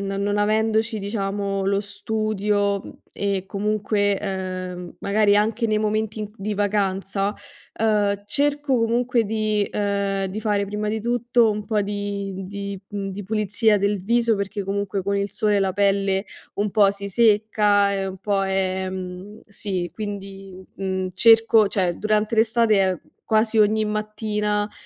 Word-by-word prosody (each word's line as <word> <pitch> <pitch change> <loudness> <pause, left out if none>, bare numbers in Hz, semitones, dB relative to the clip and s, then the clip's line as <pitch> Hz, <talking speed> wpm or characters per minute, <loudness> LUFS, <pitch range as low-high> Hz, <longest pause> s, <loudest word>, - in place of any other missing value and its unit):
no 195 0 -3
non 205 +1 0
avendoci, 220 +1 +1
diciamo, 195 -1 -2
lo 200 +1 +1
studio, 205 -1 -1
mhmm, - - -9 0.2
e 200 -2 -1
comunque, 205 0 0
ehm, 185 -2 -5
magari 205 0 +3
anche 220 +3 +1
nei 215 -1 +1
momenti 215 0 -1
in 210 -1 -5
di 210 0 -3
vacanza, 195 0 0 0.5
uhm, 205 -2 +2
cerco 285 +3 +1
comunque 235 +1 +1
di 215 -1 0
ehm, 200 -1 -1
di 200 +3 -5
fare 205 -2 +1
prima 210 +1 -3
di 220 +1 -1
tutto 240 0 +2
un 210 0 -4
po' 215 -2 +1
di 200 -1 -3
mhmm, 190 - -6
di 200 0 -6
mhmm, 200 -1 -4
di 195 +1 -6
pulizia 215 +1 +2
del 200 -1 0
viso, 230 0 +2
perché 200 +1 -3
comunque 195 0 -2
con 200 +1 -1
il 200 -1 -2
sole 210 0 +2
la 195 -1 +1
pelle 195 0 +1 0.3
un 205 0 -1
po' 200 -2 +4
si 200 0 -6
secca 210 -1 +3
e 195 -1 -1
un 190 0 -6
po' 195 0 0
ehm, 190 +1 -3
sì, 190 -4 -3
quindi, 195 -2 -7
mhmm, 190 -1 -2
cerco 225 -1 +6
cioè 185 -3 0
durante 215 +1 0
l'estate 220 -5 +3 0.3
quasi 220 +1 +2
ogni 215 +1 +4
mattina, 210 0 -1
uhm, 205 - -6
205 Hz, 150 wpm, -23 LUFS, 195-215 Hz, 0.5 s, cerco